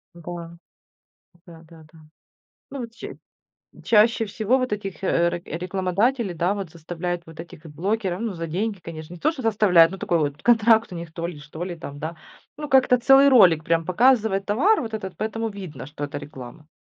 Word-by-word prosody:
Да. 170 0 -8 1.0
Да-да-да. 165 -1 -16 0.7
Ну 280 - -6
вот, 230 -2 -7
че 230 - -9 0.7
Чаще 225 +1 +4
всего 220 +4 0
вот 255 -3 -2
этих, 195 -3 -5
э, 170 -2 +2
рек 175 0 -6
рекламодателей, 190 - -1
да, 175 +4 0
вот, 195 -5 -6
заставляют 175 +2 -5
вот 165 0 -10
этих, 165 -1 -12
э, - - -10
блогеров, 190 +4 -2
ну, 230 -2 -2
за 165 -2 -5
деньги, 200 +6 -2
конечно. 165 -2 -9
Не - - -11
то 310 - +1
что 270 - -8
заставляют, 200 -7 +5
но 195 - -7
такой 170 -2 0
вот 145 -1 -2
контракт 225 -2 +4
у - - -6
них 170 -1 -8
то 170 0 -4
ли, 170 -4 -8
что 150 +3 -7
ли 180 -1 -5
там, 145 -3 -9
да. 155 +3 -5 0.4
Ну, 300 -1 -6
как-то 260 -2 +4
целый 270 +3 +6
ролик, 185 - +6
прям, 165 0 +1
показывает 210 +1 +2
товар 350 - +3
вот 225 -2 -5
этот, 190 -5 -6
поэтому 225 +3 -3
видно, 185 -10 -8
что 145 0 -6
это 145 0 -5
реклама. 145 +1 -11
180 Hz, 190 wpm, -23 LUFS, 165-220 Hz, 1.0 s, целый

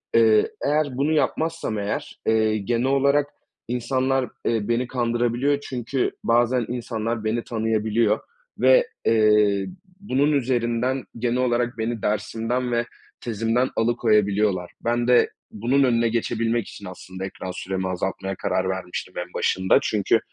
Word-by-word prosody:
Eee, 110 -2 +5 0.2
eğer 150 +1 +2
bunu 145 +3 +1
yapmazsam, 160 -6 0
eğer, 100 0 -4
eee, 110 -1 +3
genel 115 +4 -1
olarak 140 +1 +3 0.4
insanlar, 130 +2 0 0.2
eee, 110 -3 0
beni 120 +1 0
kandırabiliyor 120 +3 0
çünkü 125 +1 -1
bazen 120 +1 +2
insanlar 115 -2 -3
beni 115 +2 -1
tanıyabiliyor 110 -1 +1 0.4
ve, - - +5 0.2
eee, 105 -3 +4 0.3
bunun 145 -6 +1
üzerinden, 125 -1 0
genel 120 +1 0
olarak 120 -1 0
beni 115 0 -2
dersimden 115 +4 -1
ve 120 0 +1 0.4
tezimden 115 +2 0
alıkoyabiliyorlar. 105 -5 +1
Ben 120 +1 0
de 125 -1 +5 0.2
bunun 125 +6 +1
önüne 115 -2 +2
geçebilmek 115 0 -1
için, 100 - -10
aslında, 95 +1 -7
ekran 95 -1 -6
süremi 95 +1 -3
azaltmaya 95 +1 -3
karar 95 - -1
vermiştim 90 0 -5
en 90 0 -5
başında 95 0 +2
çünkü 105 +2 +2
115 Hz, 125 wpm, -23 LUFS, 105-125 Hz, 0.4 s, Eee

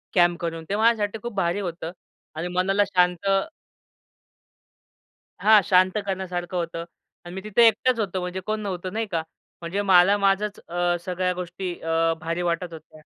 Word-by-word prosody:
Camp 175 -1 +4
करून. 165 -1 -3
ते 200 - 0
माझ्यासाठी 220 -1 +2
खूप 240 - -5
भारी 175 +1 0
होतं 170 -3 -5 0.4
आणि 165 +3 -3
मनाला 195 +3 +3
शांत 180 0 +1 2.1
हां, 215 0 +6
शांत 185 +2 +3
करण्यासारखं 185 -2 -3
होतं 165 -1 -3 0.4
अन् 175 - -8
मी 190 - -5
तिथे 220 +2 +5
एकटाच 230 +2 +2
होतो, 190 -3 -1
म्हणजे 180 +1 -4
कोण 215 0 -1
नव्हतं 185 -2 -4
नाही 225 +1 -1
का 165 -2 0 0.4
म्हणजे 175 +4 -2
मला 195 +1 +5
माझंच 200 +1 +1
अ, 175 0 0
सगळ्या 180 0 -1
गोष्टी 180 0 -5
अ, 165 0 +1
भारी 165 +1 -2
वाटत 170 0 -3
होत्या. 155 0 -13
180 Hz, 155 wpm, -24 LUFS, 175-200 Hz, 2.1 s, हां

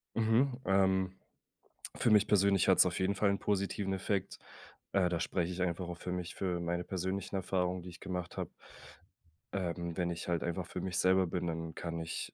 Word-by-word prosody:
Mhm. 115 +4 +3
Ähm, 95 -1 +3 0.8
für - - +2
mich 105 -1 +5
persönlich 100 -2 +4
hat's - - +7
auf - - -1
jeden 95 +2 +1
Fall 100 +1 +3
'n 100 - +1
positiven 100 0 0
Effekt. 95 0 -2 0.5
Äh, 95 -2 +3
da 85 -1 -1
spreche 90 0 -1
ich 90 +1 -4
einfach 90 0 -1
auch 85 - -5
für 90 - -5
mich, 90 -1 -4
für 90 -2 -1
meine 85 +1 -1
persönlichen 95 +1 -3
Erfahrungen, 90 -1 0
die 90 - -8
ich 90 - -12
gemacht 90 -1 -5
habe. - - -3 1.0
Ähm, 85 -3 -2
wenn 90 -2 +1
ich 85 0 -5
halt 85 -2 0
einfach 85 -1 -2
für - - -5
mich 90 -2 -2
selber 95 0 +4
bin, 90 0 -2
dann 80 -1 -4
kann 85 -1 -4
ich 80 0 -4
90 Hz, 195 wpm, -33 LUFS, 85-95 Hz, 1.0 s, hat's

